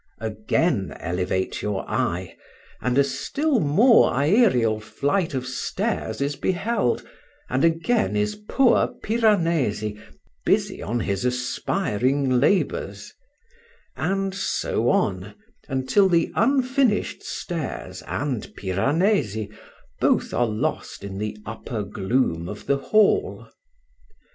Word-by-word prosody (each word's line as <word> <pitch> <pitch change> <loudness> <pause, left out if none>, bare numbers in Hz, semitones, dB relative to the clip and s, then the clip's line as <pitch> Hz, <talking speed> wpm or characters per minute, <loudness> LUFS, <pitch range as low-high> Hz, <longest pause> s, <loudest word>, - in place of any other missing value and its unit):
Again 110 - -1
elevate 90 +1 -2
your 105 -2 -3
eye, 90 +1 -2 0.5
and 125 +1 0
a 140 - +6
still 255 - 0
more 210 - +5
aërial 130 - +3
flight 145 - -1
of 130 -1 -2
stairs 125 -2 -3
is 140 +1 0
beheld, 190 - 0 0.5
and 130 +2 +1
again 165 +8 +2
is 210 0 +1 0.2
poor 270 -3 +4 0.2
Piranesi 165 - +1 0.4
busy - - +1
on 120 +2 -2
his 100 0 -2
aspiring 125 - 0
labours; 190 +9 0 0.8
and 195 0 -1
so 195 - -1
on, 95 +2 0 0.3
until 135 +9 +2
the 170 -2 +2
unfinished 260 -4 +1
stairs 165 -5 -5
and 135 -6 -3
Piranesi 110 - 0 0.5
both - - +2
are 120 - +2
lost 105 -2 -3
in 100 -1 -6
the 105 0 -3
upper 110 0 -5
gloom 95 -4 -1
of 105 - -8
the 140 - +2
hall. 215 - +2
135 Hz, 105 wpm, -24 LUFS, -, 0.8 s, a